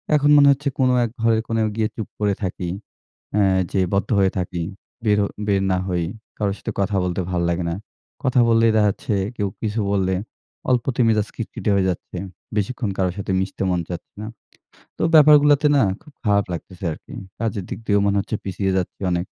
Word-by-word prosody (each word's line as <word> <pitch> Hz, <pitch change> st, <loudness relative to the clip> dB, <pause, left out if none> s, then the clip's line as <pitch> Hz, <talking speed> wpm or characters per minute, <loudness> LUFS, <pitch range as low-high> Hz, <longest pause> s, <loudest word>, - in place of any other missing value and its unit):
এখন 145 Hz, 0 st, +3 dB
মনে 140 Hz, 0 st, +7 dB
হচ্ছে 140 Hz, +1 st, -1 dB
কোন 130 Hz, -1 st, +4 dB, 0.2 s
এক -, -, -4 dB
ঘরের 115 Hz, -1 st, +3 dB
কোণোয় 110 Hz, -1 st, +1 dB
গিয়ে 110 Hz, -1 st, +1 dB
চুপ 110 Hz, -, -4 dB
করে 105 Hz, -1 st, +2 dB
থাকি। 90 Hz, -1 st, -3 dB, 0.7 s
অ্যা 105 Hz, -1 st, +4 dB, 0.3 s
যে 95 Hz, -, +1 dB
বদ্ধ 100 Hz, 0 st, 0 dB
হয়ে 95 Hz, -1 st, +3 dB
থাকি, 90 Hz, -2 st, -2 dB, 0.4 s
বেরও 105 Hz, -1 st, +3 dB, 0.2 s
বের 100 Hz, -1 st, +2 dB
না 95 Hz, -, +2 dB
হই। 90 Hz, -2 st, 0 dB, 0.3 s
কারো 100 Hz, -2 st, 0 dB
সাথে 115 Hz, -, -5 dB
কথা 100 Hz, +1 st, 0 dB
বলতে 90 Hz, 0 st, -1 dB
ভাল 90 Hz, -1 st, 0 dB
লাগে 85 Hz, +1 st, -1 dB
না। 85 Hz, -, -2 dB, 0.5 s
কথা 130 Hz, -1 st, +2 dB
বললেই 115 Hz, 0 st, +4 dB
দেখাচ্ছে, 105 Hz, 0 st, +1 dB, 0.2 s
কেউ 100 Hz, -2 st, 0 dB
কিছু 110 Hz, 0 st, -1 dB
বললে 95 Hz, -2 st, +1 dB, 0.5 s
অল্পতে 125 Hz, 0 st, +1 dB
মেজাজ 110 Hz, -1 st, +2 dB
খিটখিটে 110 Hz, -1 st, -4 dB
হয়ে 95 Hz, -1 st, +2 dB
যাচ্ছে। 90 Hz, 0 st, -5 dB, 0.4 s
বেশিক্ষণ 105 Hz, +2 st, -1 dB
কারো 95 Hz, -1 st, +1 dB
সাথে 100 Hz, -1 st, -3 dB
মিশতে 95 Hz, 0 st, -3 dB
মন 90 Hz, -1 st, +1 dB
চাচ্ছে 85 Hz, -, -7 dB
না। 110 Hz, -, -5 dB, 0.7 s
তো -, -, -2 dB
ব্যাপারগুলাতে 150 Hz, -1 st, +7 dB
না 135 Hz, -, +5 dB, 0.2 s
খুব 150 Hz, -, -17 dB
খারাপ 100 Hz, -2 st, +3 dB
লাগতেছে 90 Hz, +2 st, -7 dB
আরকি। -, -, -12 dB, 0.3 s
কাজের 110 Hz, -4 st, -2 dB
দিক -, -, -5 dB
দিয়েও 100 Hz, -1 st, +3 dB
মনে 100 Hz, 0 st, +2 dB
হচ্ছে 110 Hz, +2 st, -3 dB
পিছিয়ে 95 Hz, 0 st, -1 dB
যাচ্ছি 90 Hz, -, -4 dB
অনেক। 90 Hz, +2 st, -1 dB
100 Hz, 185 wpm, -22 LUFS, 95-115 Hz, 0.7 s, মনে